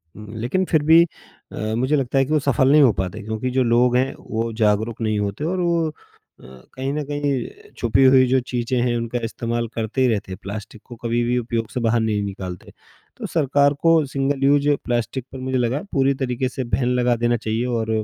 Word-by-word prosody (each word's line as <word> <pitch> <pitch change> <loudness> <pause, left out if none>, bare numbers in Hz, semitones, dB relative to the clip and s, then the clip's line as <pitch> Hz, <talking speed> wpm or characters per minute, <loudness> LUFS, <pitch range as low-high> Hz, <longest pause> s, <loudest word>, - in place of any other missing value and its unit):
उम, 105 0 -10
लेकिन 165 +11 0
फिर 155 -4 +1
भी 160 +2 +7 0.5
अ, 110 0 -3
मुझे 130 +6 +1
लगता 135 -1 -1
है 135 - +4
कि 140 - -7
वो 155 - +4
सफल 135 -1 +2
नहीं 150 +1 +6
हो 130 -5 +6
पाते, 95 +3 -4
क्योंकि 110 +4 -3
जो 130 +1 +2
लोग 120 +1 +3
हैं 130 +1 0
वो 115 +1 -3
जागरूक 110 +1 0
नहीं 110 -2 0
होते 100 +6 -3
और 180 +4 -1
वो 170 -2 +1
अ, - - -8 0.5
कहीं 65 - -7
न 150 0 -2
कहीं 145 0 -2 0.2
अ, - - -19
छुपी 120 +3 +2
हुई 130 -1 +6
जो 130 +1 +3
चीज़ें 125 0 -1
हैं, 120 -1 +1
उनका 115 +1 -3
इस्तेमाल 115 +1 -2
करते 115 +3 -2
ही 130 - +4
रहते 105 -5 -1
हैं, 95 - -5
प्लास्टिक 105 +2 -8
को 120 - -10
कभी 120 0 -1
भी 120 +1 0
उपयोग 115 -2 -2
से - - -3
बाहर 115 0 +2
नहीं 110 -2 0
निकालते। 95 -3 -7 0.5
तो - - -6
सरकार 145 -2 +2
को 165 -1 +4
सिंगल 135 0 -2
यूज़ 145 +1 +3 0.2
प्लास्टिक 120 +1 -2
पर 135 - -8
मुझे 130 0 -2
लगा 125 +4 0
पूरी 135 0 +3
तरीके 125 0 -1
से 130 +1 -4
बैन 120 +1 -1
लगा 125 -1 +2
देना 120 0 +2
चाहिए 110 +1 -2
और 115 -3 -2
125 Hz, 220 wpm, -21 LUFS, 115-135 Hz, 0.5 s, भी